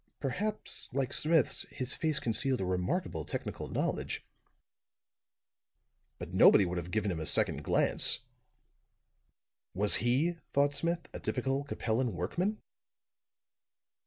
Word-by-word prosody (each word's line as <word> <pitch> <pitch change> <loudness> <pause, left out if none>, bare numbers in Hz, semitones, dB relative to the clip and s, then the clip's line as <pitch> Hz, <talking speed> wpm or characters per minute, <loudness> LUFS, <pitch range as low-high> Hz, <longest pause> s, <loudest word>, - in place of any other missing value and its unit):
Perhaps, 205 - -3
like 130 0 -1
Smith's, 160 -3 +2
his 130 0 -3
face 155 -3 0
concealed 125 +3 -1
a 95 - -1
remarkable 90 - -2
technical - - -5
knowledge; - - -3 1.9
but - - -8
nobody 100 - +7
would 90 0 -2
have 85 +1 -7
given 105 0 -1
him 85 - -3
a 80 - -4
second - - +2
glance. - - +4 1.5
Was 105 +2 +4
he, 135 - +1 0.2
thought 140 +1 +3
Smith, 170 +4 -2
a - - -6
typical 135 +2 -1
Capellan 120 -2 -1
workman? 180 - -2
130 Hz, 115 wpm, -31 LUFS, 100-155 Hz, 1.9 s, nobody